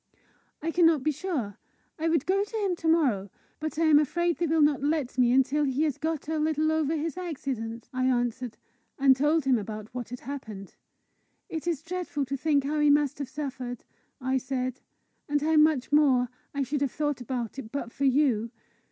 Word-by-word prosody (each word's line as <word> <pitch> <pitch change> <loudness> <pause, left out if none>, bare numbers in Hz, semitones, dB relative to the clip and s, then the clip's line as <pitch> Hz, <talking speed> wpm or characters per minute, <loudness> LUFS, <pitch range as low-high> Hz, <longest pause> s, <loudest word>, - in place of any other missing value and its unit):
"I 330 - 0
cannot 330 -5 +4
be 310 - +2
sure. 280 - -4 0.4
I 325 +1 +1
would 320 -4 +1
go 390 +2 +2
to 430 +2 -5
him 395 -4 0
to 325 - -3
morrow, 260 - +2 0.3
but 310 0 -4
I 330 - +2
am 310 -2 +6
afraid 340 +4 0
they 340 - 0
will 315 0 +3
not 290 -2 +3
let 290 -3 0
me 245 -1 +5
until 270 +3 +3
he 275 +1 +1
has 300 -4 -1
got 315 -2 -2
a 315 0 -1
little 310 0 +1
over 315 0 +1
this 325 +3 -3
accident," 260 -9 -4
I 255 0 0
answered 245 -1 -1 0.4
and 270 -1 +5
told 295 +2 +2
him 260 -3 +3
what 215 +3 -6
had 250 0 -7
happened. 220 -8 -7 0.7
"It 320 +1 -5
is 320 -4 -1
dreadful 345 -5 -3
to 275 +2 -3
think 285 0 +1
how 300 +2 -1
he 295 0 +4
must 290 -1 +3
have 280 -3 -4
suffered," 260 -4 -5 0.4
I 260 0 0
said, 255 0 -3 0.5
"and 290 0 +2
how 315 +2 +2
much 300 -4 +3
more 265 -5 +4 0.2
I 280 -1 -1
should 280 +2 -2
have 280 -3 +1
thought 295 -4 -2
about 245 0 -4
it 220 -4 -8
but 270 -4 -4
for 280 - -2
you! 260 -5 +2
285 Hz, 195 wpm, -27 LUFS, 255-315 Hz, 0.7 s, am